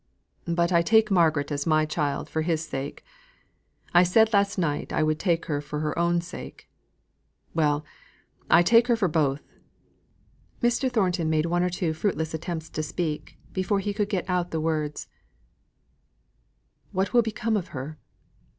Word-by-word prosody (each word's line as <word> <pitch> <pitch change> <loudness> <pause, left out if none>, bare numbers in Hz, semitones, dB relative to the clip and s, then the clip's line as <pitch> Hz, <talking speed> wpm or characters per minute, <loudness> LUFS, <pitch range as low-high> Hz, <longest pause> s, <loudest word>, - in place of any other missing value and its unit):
But 170 +1 +1
I 170 -1 +5
take 220 +4 +3
Margaret 160 -5 +2
as 145 +1 -2
my 155 -1 +3
child 150 -2 -2
for 160 - -2
his 160 -1 -1
sake. 135 -1 -6 0.9
I 175 - +7
said 220 +5 +4
last 200 0 +2
night 150 -5 -1
I 155 - +1
would 155 0 0
take 170 -3 0
her 145 -2 -2
for 150 0 -5
her 150 -1 -2
own 170 0 +2
sake. 180 +2 -10 0.9
Well, 150 -2 +1 0.6
I 175 - +6
take 230 +5 +5
her 240 - +4
for 215 -5 +1
both." 150 -3 0 1.2
Mr. 240 +2 +1
Thornton 180 -8 +1
made 155 0 +2
one 175 +1 +1
or 180 - +1
two 175 -2 -1
fruitless 160 -2 -2
attempts 160 0 -4
to 155 - -2
speak, 155 0 -4 0.2
before 185 +2 0
he 205 +1 -2
could 205 0 -1
get 190 -5 -2
out 180 -1 0
the 160 - -2
words: 155 -2 -2 1.8
"What 190 +4 -1
will 240 - +6
become 225 0 -1
of 190 -4 -2
her?" 145 +1 -7
170 Hz, 160 wpm, -26 LUFS, 155-190 Hz, 1.8 s, I